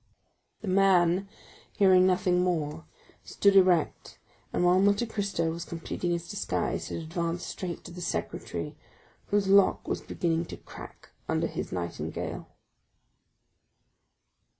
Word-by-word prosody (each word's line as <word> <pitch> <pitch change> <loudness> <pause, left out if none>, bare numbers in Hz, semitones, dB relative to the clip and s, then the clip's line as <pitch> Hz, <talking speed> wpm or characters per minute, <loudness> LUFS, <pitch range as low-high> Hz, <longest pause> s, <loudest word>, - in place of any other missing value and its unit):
The 215 - -7
man, 185 -1 +3 0.4
hearing 185 -2 +5
nothing 180 -1 +2
more, 160 -3 -2 0.4
stood 200 -1 +2
erect, 180 -4 +3 0.3
and 180 - +1
while 180 +1 +5
Monte 205 +4 +3
Cristo 200 -7 -1
was 170 +1 -5
completing 170 +1 -4
his 170 0 -2
disguise 205 - -2
had - - -4
advanced 170 +1 -3
straight 175 -3 -5
to - - -10
the 180 +1 -8
secretaire, 170 - -4 0.5
whose 205 -1 +1
lock 195 0 +4
was - - -2
beginning 165 -1 -1
to - - -8
crack - - -12 0.2
under - - +1
his - - -4
nightingale. 85 -1 -4
180 Hz, 125 wpm, -28 LUFS, 170-195 Hz, 0.5 s, hearing